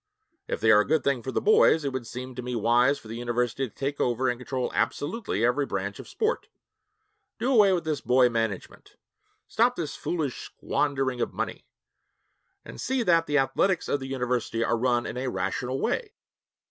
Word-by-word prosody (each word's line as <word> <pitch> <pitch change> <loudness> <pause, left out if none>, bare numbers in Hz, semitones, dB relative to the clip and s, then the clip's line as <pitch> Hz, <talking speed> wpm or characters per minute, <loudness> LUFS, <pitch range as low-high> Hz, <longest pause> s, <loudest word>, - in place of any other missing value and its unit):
If - - -2
they 110 0 +5
are 105 - +7
a 105 - +1
good 155 -2 +2
thing 140 -3 +1
for 130 - -5
the - - 0
boys, 435 - +4
it 140 - -2
would 130 -3 -4
seem 125 +2 -7
to 125 - -6
me 125 0 -4
wise 120 +5 +3
for - - -14
the 115 +1 -6
university 120 +2 -1
to - - -30
take 140 +1 -3
over 125 +2 +1
and 120 0 -2
control 130 0 -3
absolutely 150 - -1
every 135 +3 +1
branch 100 +1 -3
of - - -9
sport; 450 +1 -1 0.9
do 260 +3 0
away 210 -5 +6
with 180 -2 +1
this 155 -3 -2
boy 125 0 +4
management; 115 -5 -4 0.5
stop 245 +2 +2
this 160 -8 -4
foolish 155 -7 -3
squandering 135 -4 -1
of - - -2
money, - - -4 1.0
and - - -9
see 260 -2 0
that 170 -4 +3
the 145 - +2
athletics 145 +7 +1
of 145 - 0
the 130 - -6
University 125 -3 -1
are 115 - +1
run 120 0 +1
in 125 - -5
a 130 +1 -2
rational 125 +1 -2
way.' 435 - -2
130 Hz, 195 wpm, -26 LUFS, 120-160 Hz, 1.0 s, are